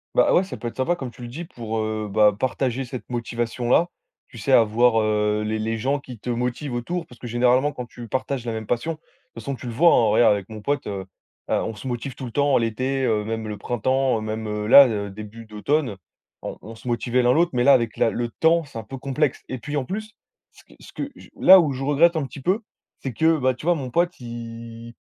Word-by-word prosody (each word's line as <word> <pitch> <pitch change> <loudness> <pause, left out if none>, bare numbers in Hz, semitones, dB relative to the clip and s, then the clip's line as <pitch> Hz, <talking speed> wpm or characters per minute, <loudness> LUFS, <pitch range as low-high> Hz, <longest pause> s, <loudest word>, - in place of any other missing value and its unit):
Bah - - +4
ouais, 180 - +5
ça 190 - -7
peut 120 - -5
être 115 - -7
sympa 130 +7 +1
comme 130 -7 -6
tu 120 - -15
le 120 - -6
dis 155 +9 -7
pour, 115 -7 -5
heu, 110 -1 -2
bah 105 0 +4
partager 130 +1 -1
cette 120 -3 -8
motivation 120 0 -3
là. 170 +7 +4 0.4
Tu 115 - -11
sais 110 +6 -2
avoir 115 0 +4
heu, 105 0 +1
les 110 +1 -2
les 110 +1 -1
gens 135 +6 0
qui 130 -3 -10
te 120 +4 -4
motivent 125 +3 -2
autour, 170 +9 -3
parce 125 -6 -17
que 120 - -7
généralement 125 +4 +3
quand 125 -3 -6
tu 120 0 -10
partages 130 +1 -2
la 115 - -2
même 110 -1 -4
passion, 120 +9 -1
de - - -12
toute 160 - -38
façon 115 +4 -4
tu 125 - -9
le - - -3
vois, 165 +9 +5
hein, 115 - +4
regarde 110 +1 +5
avec 100 0 -4
mon 110 -1 -8
pote, 140 +4 -1
heu, 100 -2 -3 0.5
heu, - - +3
on 110 - -4
se 130 - -8
motive 125 +1 -4
tout 130 - -7
le 120 - -7
temps 140 +2 +3
l'été, 130 +4 -1
heu, 110 -3 +1
même 110 0 -4
le 105 -1 -5
printemps, 130 +3 +1
heu, - - -4
même, 110 0 -4
heu, 105 0 -3
là 135 +5 +9
le 100 -3 -3
début 110 +3 -9
d'automne, 110 +3 -1 0.5
on - - -6
on 115 - -9
se 115 +2 -13
motivait 120 +1 +1
l'un 125 0 +4
l'autre, 170 +4 +3
mais 120 -1 +2
là 140 +2 +7
avec 115 -3 +2
la - - +2
le 120 +1 -2
temps, 165 +7 +2
c'est 140 -6 -8
un - - -7
peu 135 +6 -8
complexe. 140 +1 -1
Et 130 - -5
puis 150 +3 -4
en 135 - -1
plus, 215 +7 -5 0.4
ce - - -19
que - - -21
ce - - -14
que 285 - -5
je - - -15
là 190 0 +9
où 155 -5 +2
je 135 0 -4
regrette 150 +5 +4
un 155 -3 0
petit 135 +1 -10
peu, 190 - +1 0.4
c'est 135 - -5
que 160 +6 +3
bah 130 -2 +2
tu 130 +6 -9
vois 175 - +4
mon 135 -5 -5
pote, 175 +5 0
il 115 -1 -8
120 Hz, 260 wpm, -23 LUFS, 110-140 Hz, 0.5 s, là